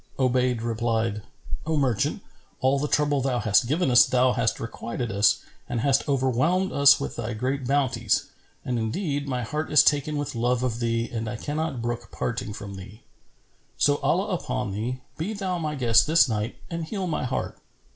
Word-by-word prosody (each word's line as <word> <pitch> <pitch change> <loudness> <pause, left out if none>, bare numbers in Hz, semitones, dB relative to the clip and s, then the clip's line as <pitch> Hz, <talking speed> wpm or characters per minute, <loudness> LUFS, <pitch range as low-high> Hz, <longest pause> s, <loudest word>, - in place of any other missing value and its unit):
Obayd 125 -2 +1
replied, 115 -2 -1 0.5
"O 160 -1 +1
merchant, 130 -6 0 0.4
all 135 +2 +2
the 150 - -1
trouble 145 -2 +1
thou 130 -1 0
hast 110 +2 +3
given 155 +1 +1
us 120 - +8
thou 125 0 +2
hast 115 -2 0
requited 115 +1 -5
us 100 +1 +3 0.3
and 120 -2 -1
hast 140 +2 +2
overwhelmed 140 +8 +1
us 140 0 +6
with - - -4
thy 120 0 -3
great 130 +3 -2
bounties: 130 -5 +1 0.4
and 125 -2 -1
indeed 140 - -2
my 125 -2 -2
heart 150 +7 -3
is 150 - +7
taken 150 +1 +2
with 145 -1 -3
love 120 +1 0
of 120 -2 -1
thee 115 0 0
and 115 -2 -3
I 120 - -4
cannot 145 0 -3
brook 120 0 -4
parting 115 -3 -3
from 100 -1 -8
thee. 100 +4 -12 0.7
So, 145 0 +3
Allah 180 +9 0
upon 125 - -2
thee, 120 +6 -3 0.2
be 185 +8 -2
thou 190 -4 -2
my 155 -2 -2
guest 120 -2 +4
this 160 -1 +5
night 110 0 -2
and 165 -1 -4
heal 190 +3 -4
my 165 -4 -2
heart." 125 - -3
130 Hz, 180 wpm, -25 LUFS, 115-145 Hz, 0.7 s, us